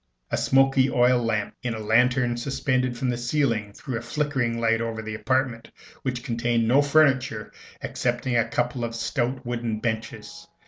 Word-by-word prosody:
A - - +1
smoky 135 0 +3
oil 125 -1 +3
lamp 110 -3 -1
in 120 -2 -2
a - - -6
lantern 120 +3 +2
suspended 130 0 -1
from 130 0 -1
the 120 - -2
ceiling 120 -5 0
threw 120 +3 -5
a - - -9
flickering 130 -3 -1
light 115 0 +2
over 115 -1 -3
the 110 0 -5
apartment, 130 0 -1 0.3
which 125 -2 -3
contained 115 -2 0
no 130 +5 +5
furniture 130 -7 +2 0.3
excepting 125 0 -1
a 115 -1 +2
couple 120 +1 -1
of 115 0 -3
stout 120 +3 -2
wooden 120 -2 -2
benches. 110 -1 -5
120 Hz, 165 wpm, -25 LUFS, 115-130 Hz, 0.3 s, no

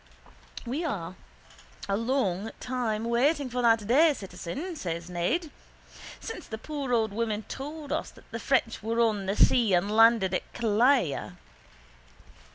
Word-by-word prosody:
—We 275 +8 -2
are 185 - -3 0.7
a 195 - +1
long 225 -4 0
time 230 -4 -2
waiting 260 +4 +1
for 250 +1 -1
that 225 -3 +3
day, 290 +7 +5
citizen, 270 - -6
says 170 - -5
Ned. 235 - -1 0.7
Since 450 -6 -7
the 220 - -5
poor 280 +1 -5
old 220 -4 +1
woman 220 -1 -2
told 290 +4 -7
us - - -1
that - - -19
the 230 - -4
French 245 -3 0
were 225 +2 -1
on 215 -4 +1
the 195 - 0
sea 225 -6 +4
and 200 +4 0
landed 225 -4 +5
at 180 - -3
Killala. 235 - +2
230 Hz, 145 wpm, -28 LUFS, 205-270 Hz, 0.7 s, day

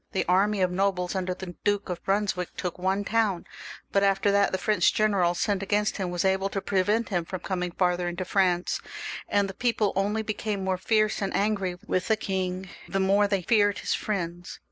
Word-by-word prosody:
The 190 - 0
army 195 +3 +2
of 180 -1 +2
nobles 185 -1 0
under 185 -1 -2
the 180 -2 -8
Duke 205 -1 +1
of 180 -1 -5
Brunswick 195 -3 0
took 180 -1 -4
one 190 +2 0
town; 205 -5 0 0.5
but, 200 - +3
after 195 0 +3
that, 200 0 +3
the 190 - 0
French 215 +2 +2
general 195 -5 +2
sent 200 +1 0
against 205 +2 0
him 190 -3 -2
was 175 +1 -1
able 190 +1 +2
to 195 - -2
prevent 205 +4 +1
him 175 -4 0
from 180 +1 -6
coming 180 -2 -2
farther 180 0 +1
into 175 +1 -3
France, 180 -2 +1 0.5
and 200 -1 +2
the 195 - -6
people 225 -2 0
only 205 +3 0
became 210 -2 -3
more 190 -1 -1
fierce 215 +2 +1
and 195 - -1
angry 195 -3 0
with 185 -4 -1
the 220 -1 +3
king 190 -2 -2 0.2
the 195 - 0
more 200 +2 +3
they 195 -2 0
feared 205 -1 +3
his - - -1
friends. 175 -4 -3
195 Hz, 200 wpm, -27 LUFS, 180-205 Hz, 0.5 s, but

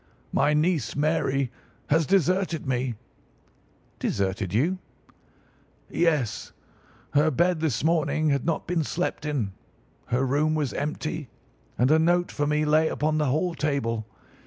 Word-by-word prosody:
My 145 +2 +3
niece, 160 +1 +1
Mary, 140 -3 +1 0.4
has 160 +1 +3
deserted 185 -2 +1
me." 125 -2 -1 1.0
"Deserted 95 -1 -1
you?" 160 - +1 1.1
"Yes. 155 -10 0 0.6
Her 150 +2 +4
bed 170 +4 +2
this 150 -8 -1
morning 155 -1 +2
had 140 -2 +1
not 165 -1 -1
been 170 -2 0
slept 165 -1 -2
in, 120 -10 -1 0.5
her 130 +3 +1
room 150 +4 +1
was 150 -4 -1
empty, 150 -1 -3 0.5
and 125 +4 +3
a 160 - +5
note 175 +2 +2
for 145 -1 -1
me 150 +1 +1
lay 155 +1 +4
upon 155 +1 0
the 150 - +1
hall 155 +7 +1
table. 130 -8 -1
150 Hz, 135 wpm, -26 LUFS, 135-160 Hz, 1.1 s, a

